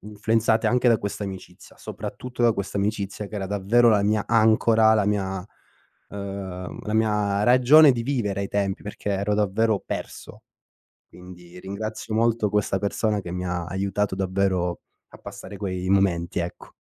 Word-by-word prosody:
influenzate 110 +2 0
anche 125 0 +3
da 115 -3 +4
questa 100 +1 -5
amicizia, 95 -2 -9
soprattutto 125 -1 -6
da 115 - +5
questa 100 -1 -5
amicizia 100 0 -2
che 105 - -7
era 95 -1 -3
davvero 105 +5 +3
la 105 -3 +4
mia 105 0 +1
ancora, 110 0 +4
la 105 -2 +1
mia 95 -2 -2 0.6
ehm, 95 -2 -6
la 105 - -3
mia 105 -2 +1
ragione 130 +4 +7
di 115 - -3
vivere 115 -7 -2
ai 100 - -3
tempi, 100 -1 -2
perché 105 0 -5
ero 100 +1 -1
davvero 105 +1 +1
perso; - - -7 0.6
quindi 90 0 -13
ringrazio 110 +3 -5
molto 115 -1 +2
questa 100 -1 0
persona 105 +1 -1
che 90 - -8
mi 90 0 -4
ha 90 -1 -3
aiutato 100 +2 -2
davvero 95 -2 -1 0.3
a - - -15
passare 100 -1 -10
quei 95 -2 -4
momenti, 90 -4 +1
ecco. 85 0 -6
100 Hz, 155 wpm, -24 LUFS, 95-110 Hz, 0.6 s, ragione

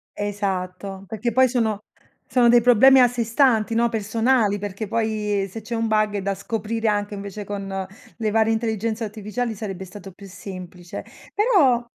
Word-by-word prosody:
Esatto, 195 -1 -3
perché 225 +3 -2
poi 260 +1 +5
sono 225 -4 0 0.5
sono 245 -2 +4
dei 240 0 +7
problemi 250 +3 +6
a 250 - +7
sé 240 -1 -2
stanti, 230 -1 +2
no, 235 +1 +3
personali, 225 -1 +1
perché 205 +1 -5
poi 215 -3 -1
se 225 +4 -8
c'è 230 +2 -5
un 225 0 0
bug, 215 -1 +1
eh, 200 - -1
da 200 +1 -1
scoprire 225 +3 -2
anche 205 0 -1
invece 200 0 -6
con 195 -2 -4 0.3
le 220 -2 -1
varie 220 +1 +3
intelligenze 225 0 -1
artificiali 220 +2 -4
sarebbe 195 -3 -6
stato 195 +1 -11
più 200 +2 -13
semplice. 180 -2 -9 0.3
Però 370 - +4
215 Hz, 165 wpm, -23 LUFS, 200-230 Hz, 0.5 s, dei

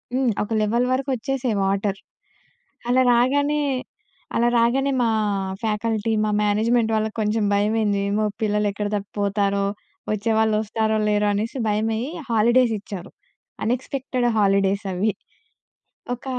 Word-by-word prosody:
హ్మ్. 260 -3 +2
ఒక 210 - -8
level 235 +4 +1
వరకొచ్చేసేయి 260 -3 -1
water. 195 0 -1 0.9
అలా 260 +1 +4
రాగానే, 285 +5 +2 0.7
అలా 235 +1 +3
రాగానే 270 +4 +2
మా 230 - +2 0.5
ఫ్యాకల్టీ, 220 0 -1
మా 210 - 0
మేనేజ్మెంట్ 225 +2 +2
వాళ్ళకి 220 +1 -2
కొంచెం 215 +1 0
భయమైంది. 210 0 +1
ఏమో 215 +1 +1 0.2
పిల్లలు 210 0 +1
ఎక్కడ 205 0 -3
తప్పిపోతారో? 200 0 -1 0.5
వచ్చేవాళ్ళు 220 0 +1
వస్తారో? 220 0 0
లేరో? 210 0 +2
అనేసి 220 +6 -2
భయమయ్యి 220 +5 -1 0.2
హాలిడేస్ 235 +2 +4
ఇచ్చారు. 195 -2 -8 0.5
అనెక్స్‌పెక్టెడ్ 255 +1 -1
హాలిడేస్ 200 0 +2
అవి. 205 +4 +1 1.0
ఒక 245 - -19
220 Hz, 115 wpm, -23 LUFS, 205-240 Hz, 1.0 s, అలా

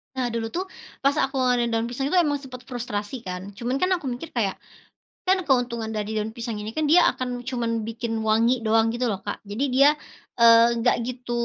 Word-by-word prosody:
Nah, 255 -2 0
dulu 230 -1 -2
tuh 365 - 0 0.4
pas 275 - +5
aku 270 - -2
ngewadahin 245 -2 +2
daun 225 +1 0
pisang 270 +3 -2
itu 340 - 0
emang 290 -2 0
sempat 250 -2 -9
frustrasi 230 -3 -4
kan, 180 0 -4 0.2
cuman 245 +4 -2
kan 365 - +2
aku - - -11
mikir 295 +6 -7
kayak, 200 -5 0 0.7
kan 380 +1 +4
keuntungan 245 -4 +1
dari 210 0 -3
daun 220 +1 -4
pisang 230 -1 -4
ini 215 +1 -5
kan 310 - 0
dia 355 - +8 0.2
akan 255 -1 -3 0.2
cuman 240 -2 -1 0.2
bikin 230 +1 -4 0.2
wangi 225 +3 +4
doang 225 +1 +4
gitu 245 +1 -1
loh, 195 - -3
Kak. 205 - -3
Jadi 225 +7 -2
dia, 275 +2 +6 0.5
eee, 230 0 +7
enggak 235 +1 +2
gitu 245 -1 -6
240 Hz, 205 wpm, -24 LUFS, 225-260 Hz, 0.7 s, dia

